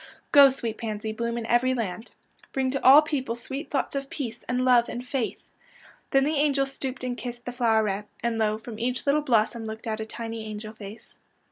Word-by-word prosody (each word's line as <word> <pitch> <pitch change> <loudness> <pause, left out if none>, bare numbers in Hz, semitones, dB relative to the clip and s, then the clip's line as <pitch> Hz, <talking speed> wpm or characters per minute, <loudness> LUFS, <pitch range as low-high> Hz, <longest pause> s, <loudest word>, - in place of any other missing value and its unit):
" - - -38
Go, 280 -1 +9
sweet 235 -4 -4
pans}^, 215 -1 -4
bloom 235 +1 -2
in 230 - -3
every 250 +3 +2
land. 220 -1 -4 0.4
Bring 265 -1 0
to 275 - -3
all 280 +4 +9
peojjle 265 -6 -2
sweet 270 +5 -6
thoughts 285 - -1
of 275 0 -3
peace 240 -5 -5
and 250 +1 +1
love 245 -2 +5
and 245 +1 -6
faith." 255 -3 -2 0.7
Then 270 0 +4
the 300 +2 0
angel 280 -1 +2
stooped 270 -1 -5
and 250 -1 -2
kissed 240 -1 -7
the 245 - -4
floweret, 220 -4 +1 0.2
and 235 -1 0
lo, 215 -1 +1
from 220 0 -9
each 250 +2 -2
little 290 +2 +3
blossom 230 -3 +1
looked 220 +2 -7
out 220 -1 -2
a 220 - -3
tiny 225 -1 -5
angel 215 0 -7
face. 215 0 -11
240 Hz, 210 wpm, -26 LUFS, 220-265 Hz, 0.7 s, Go